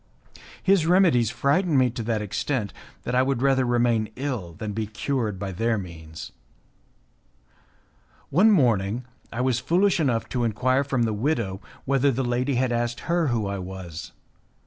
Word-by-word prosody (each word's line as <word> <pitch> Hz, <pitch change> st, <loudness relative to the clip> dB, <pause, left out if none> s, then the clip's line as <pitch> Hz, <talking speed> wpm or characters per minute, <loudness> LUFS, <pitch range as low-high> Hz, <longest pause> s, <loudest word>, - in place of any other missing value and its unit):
His 190 Hz, -4 st, +3 dB
remedies 170 Hz, -, +4 dB
frightened 145 Hz, +6 st, +1 dB
me 130 Hz, -2 st, +3 dB
to 120 Hz, -, -5 dB
that 110 Hz, -1 st, -1 dB
extent 105 Hz, +1 st, -2 dB, 0.3 s
that 125 Hz, -, -3 dB
I 125 Hz, -, +4 dB
would 130 Hz, -1 st, 0 dB
rather 135 Hz, -2 st, +3 dB
remain 120 Hz, -3 st, +1 dB
ill 125 Hz, -11 st, -4 dB
than 105 Hz, +4 st, -5 dB
be 110 Hz, 0 st, -2 dB
cured 110 Hz, -1 st, -2 dB
by 95 Hz, 0 st, -4 dB
their 115 Hz, +5 st, 0 dB
means. 80 Hz, -4 st, -8 dB, 2.0 s
One 185 Hz, +9 st, +5 dB
morning 120 Hz, -, +2 dB, 0.3 s
I 120 Hz, -, -3 dB
was 125 Hz, -2 st, +1 dB
foolish 180 Hz, +6 st, +2 dB
enough 125 Hz, -7 st, +1 dB
to 125 Hz, -2 st, -1 dB
enquire 130 Hz, +4 st, +1 dB
from 135 Hz, -3 st, 0 dB
the 110 Hz, -2 st, 0 dB
widow 110 Hz, -5 st, -1 dB, 0.2 s
whether 140 Hz, +1 st, +2 dB
the 130 Hz, +1 st, -1 dB
lady 125 Hz, +3 st, 0 dB
had 125 Hz, 0 st, +1 dB
asked 120 Hz, 0 st, -1 dB
her 170 Hz, -1 st, +1 dB
who 115 Hz, -5 st, 0 dB
I 100 Hz, 0 st, -3 dB
was. 90 Hz, -3 st, -7 dB
120 Hz, 160 wpm, -25 LUFS, 105-135 Hz, 2.0 s, One